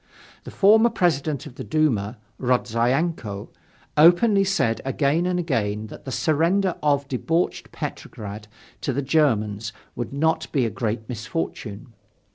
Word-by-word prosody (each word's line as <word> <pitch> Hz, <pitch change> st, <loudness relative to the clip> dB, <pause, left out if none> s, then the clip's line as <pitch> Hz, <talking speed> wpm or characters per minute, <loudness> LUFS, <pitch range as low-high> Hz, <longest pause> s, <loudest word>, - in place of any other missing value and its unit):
The -, -, -7 dB
former 220 Hz, +4 st, +5 dB
President 155 Hz, -, 0 dB
of -, -, -10 dB
the -, -, -5 dB
Duma, 125 Hz, -9 st, 0 dB, 0.2 s
Rodzyanko, 125 Hz, -1 st, 0 dB, 0.5 s
openly 180 Hz, +6 st, +6 dB
said 190 Hz, -13 st, +1 dB
again 140 Hz, +5 st, +1 dB
and 180 Hz, 0 st, 0 dB
again 110 Hz, -11 st, -1 dB
that -, -, -11 dB
the 135 Hz, -, -5 dB
surrender 170 Hz, +7 st, +2 dB
of 140 Hz, -2 st, +1 dB
debauched 160 Hz, +6 st, -1 dB
Petrograd 105 Hz, 0 st, -7 dB, 0.3 s
to 135 Hz, -, -1 dB
the 140 Hz, +3 st, -1 dB
Germans 110 Hz, -8 st, +1 dB, 0.2 s
would 120 Hz, -1 st, -4 dB
not 160 Hz, +4 st, 0 dB
be 135 Hz, -5 st, +2 dB
a 115 Hz, -, -2 dB
great 110 Hz, -3 st, -3 dB
misfortune. 120 Hz, -, -5 dB
140 Hz, 130 wpm, -24 LUFS, 115-165 Hz, 0.5 s, openly